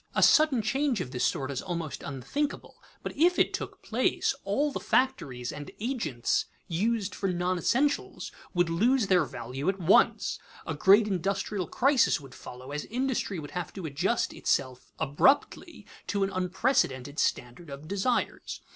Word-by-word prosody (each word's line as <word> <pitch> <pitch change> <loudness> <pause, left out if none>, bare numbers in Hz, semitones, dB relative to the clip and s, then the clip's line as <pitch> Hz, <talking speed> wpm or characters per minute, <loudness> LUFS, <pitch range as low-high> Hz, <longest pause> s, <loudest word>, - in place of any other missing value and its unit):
A - - +3
sudden 295 -7 +5
change 265 +2 0
of 125 - -4
this 125 -2 -2
sort 135 +1 0
is 135 - -3
almost 170 -5 -4
unthinkable, 205 - -4 0.2
but - - -5
if 350 +5 +3
it - - +2
took - - -5
place, - - +1
all 295 +1 0
the - - -4
factories 140 - 0
and 145 0 -8
agents 220 - -1 0.2
used 205 +4 -1
for 195 - -2
non 180 +1 -1
essentials 280 - 0 0.2
would 175 -1 +3
lose 225 +9 +2
their 180 -4 +3
value 130 +5 -4
at 195 - -1
once. 175 +2 +3 0.3
A - - -3
great 205 +2 +5
industrial 195 0 -2
crisis 270 - +3
would 135 -3 -13
follow, 125 +2 -10
as 150 +1 -4
industry 245 -5 -2
would 145 -3 -7
have 180 -3 -4
to 190 -4 -7
adjust 170 +10 0
itself 130 -2 -1
abruptly 145 - +1 0.2
to 200 -1 0
an 195 - -1
unprecedented 180 - 0
standard 125 +7 -2
of 140 +2 -9
desires. 200 +7 -1
185 Hz, 155 wpm, -28 LUFS, 145-240 Hz, 0.3 s, sudden